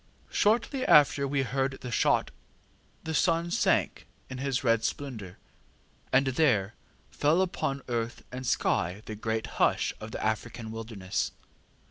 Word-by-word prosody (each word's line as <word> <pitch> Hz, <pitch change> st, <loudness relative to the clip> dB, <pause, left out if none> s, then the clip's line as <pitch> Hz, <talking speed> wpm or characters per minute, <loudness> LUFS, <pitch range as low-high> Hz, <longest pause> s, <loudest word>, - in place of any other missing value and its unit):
ŌĆ£Shortly 235 Hz, +5 st, +2 dB
after 145 Hz, -1 st, +5 dB
we 135 Hz, 0 st, 0 dB
heard 135 Hz, +1 st, -1 dB
the 125 Hz, -, -6 dB
shot -, -, +2 dB, 0.7 s
the 160 Hz, -, -4 dB
sun 170 Hz, +2 st, +2 dB
sank -, -, +1 dB, 0.2 s
in 130 Hz, -, -5 dB
his 135 Hz, -1 st, -1 dB
red 115 Hz, -2 st, +3 dB
splendour, 110 Hz, -9 st, -4 dB, 0.7 s
and 135 Hz, +2 st, +4 dB
there 125 Hz, -7 st, +2 dB, 0.4 s
fell 150 Hz, +4 st, +2 dB
upon 140 Hz, -7 st, -1 dB
earth 120 Hz, -1 st, -3 dB
and 130 Hz, 0 st, -5 dB
sky 90 Hz, 0 st, 0 dB
the 110 Hz, -, -6 dB
great 110 Hz, +1 st, -2 dB, 0.2 s
hush -, -, +2 dB
of 110 Hz, -, -7 dB
the -, -, -4 dB
African 110 Hz, +1 st, -3 dB
wilderness. 110 Hz, -4 st, -3 dB
125 Hz, 135 wpm, -29 LUFS, 110-145 Hz, 0.7 s, after